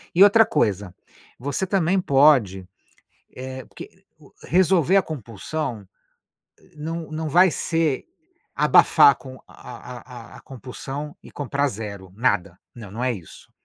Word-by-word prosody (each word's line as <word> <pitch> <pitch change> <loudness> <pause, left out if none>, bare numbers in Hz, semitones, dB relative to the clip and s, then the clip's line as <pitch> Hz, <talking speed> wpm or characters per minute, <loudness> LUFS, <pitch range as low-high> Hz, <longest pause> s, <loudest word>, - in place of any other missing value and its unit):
E 190 - +8
outra 220 +2 +6
coisa, 100 - -1 0.4
você 145 +8 -2
também 190 -1 +1
pode 135 - +3 0.7
eh 130 0 -7
porque - - -11 0.6
resolver 185 0 +3
a - - +2
compulsão 120 - -6 0.9
não 160 +2 -6
não 155 0 -4
vai 180 +3 +5
ser 165 -4 -1 0.5
abafar 430 - +6
com 130 -1 -11
a - - -17 0.4
a 120 -1 -12
a - - -11
a - - -15
compulsão 135 +3 -8
e - - -13
comprar 145 0 -1
0. 100 -4 -8
Nada. 95 -6 -1
Não, 110 -4 -11
não 120 +4 -5
é 130 -1 +1
isso. 90 -6 -13
135 Hz, 130 wpm, -23 LUFS, 115-160 Hz, 0.9 s, E